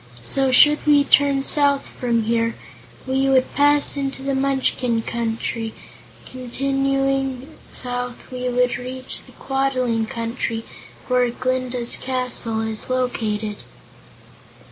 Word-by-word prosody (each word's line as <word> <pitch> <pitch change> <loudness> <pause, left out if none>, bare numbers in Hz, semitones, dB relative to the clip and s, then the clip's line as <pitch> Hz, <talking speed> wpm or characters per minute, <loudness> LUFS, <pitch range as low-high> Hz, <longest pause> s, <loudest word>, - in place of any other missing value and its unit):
"So, 270 - +1
should 295 +4 +6
we 290 -1 +6
turn 280 -1 +3
south 280 -1 +3
from 235 -2 -1
here, 230 +1 0 0.5
we 265 +1 +1
would 260 -1 +2
pass 290 0 +3
into 270 -1 -4
the 275 0 -1
Munchkin 265 -3 0
Country, 225 -1 -3 0.4
and - - -22
continuing 270 +1 -2 0.2
south 245 0 -6
we 250 0 -3
would 250 0 +1
reach 255 +1 -5
the - - -16
Quadling 255 -4 -1
Country 230 0 -3 0.4
where 250 -1 +2
Glinda's 255 0 0
castle 250 -3 -2
is 220 +1 +4
located." 220 -5 -2
255 Hz, 115 wpm, -21 LUFS, 235-270 Hz, 0.5 s, should